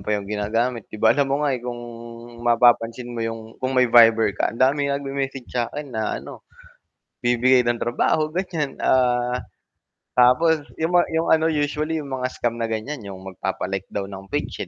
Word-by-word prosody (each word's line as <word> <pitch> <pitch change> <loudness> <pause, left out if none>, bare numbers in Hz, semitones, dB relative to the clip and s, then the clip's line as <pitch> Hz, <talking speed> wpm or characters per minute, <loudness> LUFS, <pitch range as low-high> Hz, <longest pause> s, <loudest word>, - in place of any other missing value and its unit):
pa 105 +2 -1
yung 100 - -5
ginagamit 115 +3 -2
'di - - -9
ba 110 +1 +5
alam 140 +1 +1
mo 140 +2 0
nga 145 - +1
,eh, 125 - -3
kung 120 0 -6 0.6
mapapansin 120 0 +2
mo 115 - -5
yung 115 0 -3 0.2
kung 130 0 -1
may 125 - +6
viber 115 -3 +6
ka - - 0
ang 115 - -10
dami 140 +2 +2
nagme-message 135 -2 -3
sakin 125 +3 -3
na 110 -1 -2
ano, - - -10 0.8
bibigay 125 +1 +4
ng 120 0 0
trabaho 155 +6 +1
ganyan, 170 -7 -2
ah, 125 -1 +2 0.8
tapos 155 +6 +5 0.2
yung 165 +2 -1
ma 175 - +6
yung 160 0 0
ano 160 0 +3
usually 150 +1 -1
yung 140 - -9
mga 130 -1 -2
scam 115 -1 -2
na 115 - -1
ganyan 115 +5 -4
yung 95 -1 -8
magpapa-like 95 0 -4
daw 100 -1 -3
ng 95 0 -10
page, - - -3
eh, - - -4
125 Hz, 185 wpm, -22 LUFS, 115-140 Hz, 0.8 s, may